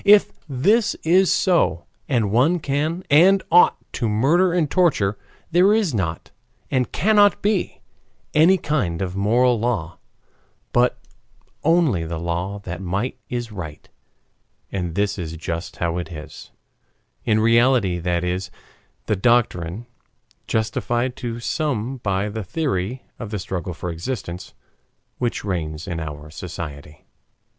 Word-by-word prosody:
If 205 0 +6 0.2
this 200 - +2
is 185 +3 +4
so, 170 - +2 0.2
and 115 -7 +1
one 135 +11 +3
can 155 +4 -1
and 185 +6 +6
ought 175 +2 +6 0.2
to 115 - -1
murder 155 - +3
and 170 -3 +1
torture, 140 - +2 0.4
there 185 +5 +5
is 205 - +1
not, 85 -6 -3 0.4
and 130 -3 +1
cannot 205 0 +4
be, 205 -3 0 0.5
any 170 +5 +6
kind 100 - -1
of 90 0 -4
moral 120 +4 +3
law, 105 -8 -2 0.7
but 125 +1 +3 0.7
only 160 - +3
the 80 0 -4
law 85 +4 -3
that 85 -1 -6
might 100 +7 -2
is 120 -2 -4
right. 80 -7 -8 0.8
And 90 -4 -3
this 100 0 0
is 80 -1 -5
just 85 +1 -5
how 85 0 -1
it 90 - -6
is. 75 -2 -9 0.7
In 110 -1 +2
reality 115 -4 +3
that 85 0 -1
is 90 +1 -2 0.6
the 105 - +1
doctrine 105 -3 +1 0.6
justified 120 +3 -1
to 120 -1 -4
some 130 -2 -2
by 100 -3 -1
the 110 +1 -4
theory 125 - -2 0.2
of 115 - -6
the 105 - -3
struggle 90 -3 -4
for 90 +1 -4
existence 90 -1 -6 0.6
which 120 -4 -2
reigns 80 -5 -3
in 85 -3 -3
our 75 -1 -7
society. 75 -3 -8
110 Hz, 135 wpm, -22 LUFS, 90-145 Hz, 0.8 s, If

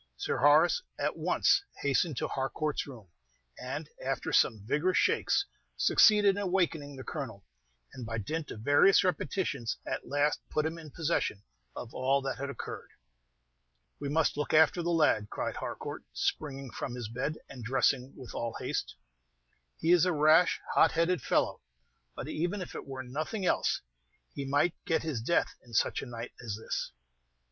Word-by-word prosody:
Sir - - -1
Horace 155 - +5 0.2
at - - -1
once - - +2 0.2
hastened 140 +1 +1
to - - -1
Harcourt's 145 +3 -2
room, 115 -9 -11 0.5
and, - - -5 0.2
after - - -2
some 105 -3 +3
vigorous 160 +10 +1
shakes, 400 - +2 0.3
succeeded 210 -2 +6
in 205 - -2
awakening 170 -7 0
the 130 - -8
Colonel, 115 - -6 0.5
and 125 - -7
by 110 0 -4
dint 150 +10 -3
of 105 - -7
various 145 - +5
repetitions 150 - -1
at - - -4
last 145 +1 +1
put 155 - 0
him 160 +1 -3
in 155 -2 -10
possession 145 -10 -1 0.3
of 120 - -7
all 135 +2 +2
that 135 -1 -3
had 140 +1 -3
occurred. 140 - -7 1.1
"We 145 - -3
must 155 0 +1
look 150 +1 0
after 160 +3 +5
the 170 - -1
lad," 150 -11 +3
cried - - -3
Harcourt, - - -5
springing 135 -4 -2
from 125 - -5
his 120 -3 -5
bed, 125 +7 -3
and 125 - -9
dressing 130 +2 +1
with 130 -3 -10
all 115 -1 -3
haste. - - -3 0.8
"He 165 - +1
is 175 -1 +6
a 180 - +2
rash, 155 +2 +5
hot 160 - +5
headed 170 +1 +2
fellow; - - +1 0.5
but - - -6
even 175 +6 -2
if - - -10
it - - -7
were 130 -1 -5
nothing 155 - -3
else, - - +1 0.5
he 140 - -4
might 145 +5 +2
get 160 - +1
his 150 -8 -2
death 170 +9 +1
in 120 -2 -11
such - - +2
a - - -7
night 120 0 -6
as 110 -4 -3
this." 110 - -3
145 Hz, 170 wpm, -30 LUFS, 125-165 Hz, 1.1 s, succeeded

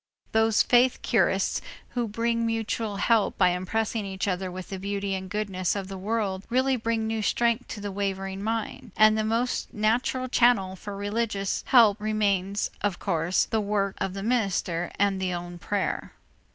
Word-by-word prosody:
Those 220 0 +4
faith 245 +1 +3
curists - - +2 0.3
who 240 -2 -2
bring 230 +2 0
mutual 225 -1 -1
help 215 +1 +2
by - - +5
impressing 210 +5 -1
each 195 0 -3
other 185 0 -1
with 185 0 -7
the 195 - -5
beauty 200 0 -2
and 190 0 -4
goodness 195 -3 -1
of 195 -1 -4
the 195 - -6
world 200 -2 -1
really 260 +2 +2
bring 230 -1 -1
new 220 0 -1
strength 235 +3 +1
to - - -6
the 205 0 -4
wavering 195 -1 -3
mind; 225 +1 -3
and 215 0 +6
the 215 - 0
most 230 +3 -1
natural 240 +4 +1
channel 235 -7 +3
for 200 +1 -7
religious 205 -1 -1
help 220 -5 +6
remains, 205 -2 0
of 200 -4 0
course, 165 +2 +1
the 220 -1 0
word 200 -1 0
of 190 0 -2
the 195 - -4
minister 195 -7 0
and 195 -1 +1
the 185 -1 -1
own 175 0 -7
prayer. 205 0 -2
205 Hz, 170 wpm, -26 LUFS, 190-225 Hz, 0.3 s, and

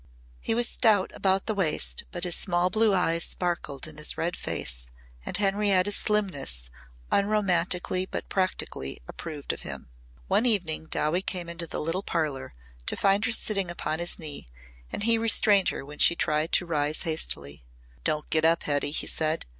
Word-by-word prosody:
He 225 - -1
was 240 0 +3
stout 210 -5 +3
about 190 0 +1
the 220 - -1
waist 185 -7 0
but 175 -2 -5
his 175 -2 +2
small 175 0 +1
blue 220 +1 +3
eyes 170 -3 +2
sparkled 170 -6 -3
in 155 -1 -7
his 150 - +3
red 170 +1 -1
face - - -5 0.4
and - - +2
Henrietta's 200 -1 +2
slimness 145 - -1 0.4
unromantically 185 -3 +1
but - - -4
practically 185 - -2
approved 155 -4 -5
of - - -8
him. - - -7 0.4
One 245 - +3
evening 175 -9 +1
Dowie 155 +3 +1
came 180 -3 -3
into 170 0 -5
the - - -4
little 165 +5 -1
parlour 150 - -3 0.3
to - - +2
find 200 +2 +3
her - - +1
sitting 200 -4 0
upon 165 -2 -2
his 175 0 -1
knee 150 - -5 0.4
and - - -3
he 230 0 +3
restrained 210 -3 +5
her - - -5
when 145 +1 -10
she 170 - +6
tried 155 0 0
to - - +4
rise 150 -2 -1
hastily. 70 - -2 0.4
"Don't 150 0 0
get 155 0 +3
up, 165 +1 +3
Hetty," 145 -1 +1
he 145 - -1
said. 155 0 -1
175 Hz, 170 wpm, -27 LUFS, 155-195 Hz, 0.4 s, she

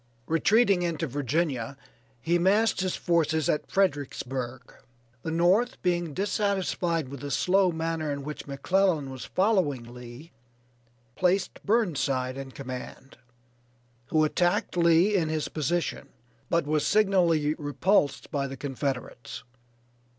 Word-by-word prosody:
Retreating 195 +4 +3
into 170 -2 -1
Virginia, 140 -2 -2 0.4
he 170 +8 +1
massed 200 +3 +3
his 185 -1 -1
forces 160 -3 +1
at 150 - -1
Fredericksburg. 135 -8 -2 0.5
The - - -4
North 180 +9 +2
being 175 -4 0
dissatisfied 190 -6 0
with 140 0 -8
the 145 - -6
slow 185 +5 +3
manner 160 -2 -2
in 140 -1 -4
which 150 +1 -7
McClellan 150 +1 +1
was 130 -1 -7
following 185 - +1
Lee, 125 +6 -11 0.8
placed 185 +2 0
Burnside 140 - 0
in 135 0 -6
command, 130 0 -8 0.9
who 155 -1 +2
attacked 175 +6 +1
Lee 170 +3 +4
in 170 -6 +1
his 155 -2 -1
position, 160 +2 -2 0.4
but 170 -3 +1
was 150 0 +1
signally 175 -8 +3
repulsed 145 0 +1
by 140 -1 -1
the 135 0 -7
Confederates. 135 -3 -4
160 Hz, 120 wpm, -27 LUFS, 140-185 Hz, 0.9 s, Lee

